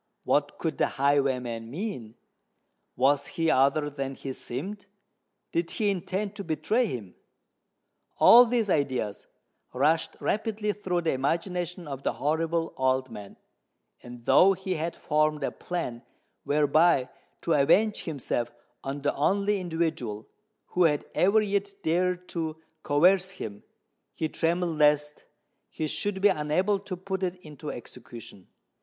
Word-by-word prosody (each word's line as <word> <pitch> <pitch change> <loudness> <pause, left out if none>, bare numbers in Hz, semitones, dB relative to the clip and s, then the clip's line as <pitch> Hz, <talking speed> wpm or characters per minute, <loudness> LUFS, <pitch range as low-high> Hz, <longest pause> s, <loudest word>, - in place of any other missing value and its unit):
What 145 0 +1
could 165 -1 -3
the - - +3
highwayman 130 -5 +1
mean? 135 - -5 0.8
Was 140 +3 +2
he 165 -1 +3
other 140 +3 +3
than 135 -2 -4
he 135 0 -6
seemed? 195 +14 -6 0.6
Did 170 0 -1
he 210 -2 0
intend 195 +2 -3
to 200 - -4
betray 165 - 0
him? 110 - -6 1.0
All 245 +1 +8
these 230 -2 +1
ideas 130 - -1 0.5
rushed 150 +5 +1
rapidly 210 -1 -1
through 180 -4 -2
the 165 - +1
imagination 170 +5 -2
of 135 -2 -6
the - - -1
horrible 165 +2 -1
old 130 -1 +1
man; 105 -3 -10 0.6
and, 120 -1 -11
though 195 +1 +6
he 190 0 -3
had 165 0 -3
formed 150 -1 0
a - - -1
plan 165 -10 -4 0.4
whereby 145 0 +3 0.3
to 165 - +1
avenge 205 +10 +3
himself 125 -6 -2 0.3
on 140 +1 -5
the 145 - +1
only 200 +7 +1
individual 160 - -2 0.4
who 180 -1 +3
had 150 -3 +1
ever 200 +4 +4
yet 200 -1 -1
dared 180 +2 0
to 160 -2 -3 0.2
coerce 180 +7 +3
him, 110 - -7 0.5
he 160 - -2
trembled 165 0 -1
lest 150 0 +2 0.4
he 155 - -3
should 190 +5 -2
be 205 - +6
unable 185 +5 +1
to 195 -2 -6
put 190 +1 -4
it 185 -1 -1
into 150 0 -8
execution. 120 -5 -10
160 Hz, 135 wpm, -27 LUFS, 140-185 Hz, 1.0 s, All